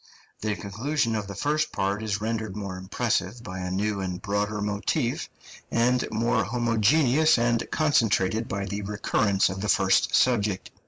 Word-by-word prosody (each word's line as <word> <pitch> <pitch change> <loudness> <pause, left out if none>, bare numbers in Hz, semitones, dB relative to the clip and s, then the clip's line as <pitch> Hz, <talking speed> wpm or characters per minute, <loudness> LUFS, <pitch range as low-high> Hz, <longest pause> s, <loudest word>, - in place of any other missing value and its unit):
The 105 -1 -1
conclusion 115 +5 -1
of 105 -2 -3
the 100 - -7
first 150 +7 0
part 100 +2 -1
is 105 -2 -2
rendered 110 -2 -3
more 100 -3 -5
impressive 115 +5 -2
by 95 -4 -6
a 90 0 -3
new 100 +2 -1
and 90 -1 -3
broader 105 +1 -2
motif, 105 0 -1 0.4
and 125 +2 +2
more 115 +2 +1
homogeneous 125 +6 +3
and 115 -1 +1
concentrated 115 - +2
by 100 0 -3
the 100 +1 -4
recurrence 100 -1 +1
of 95 0 -5
the 105 - -2
first 95 -2 +3
subject. 105 -6 +1
105 Hz, 155 wpm, -26 LUFS, 100-120 Hz, 0.4 s, homogeneous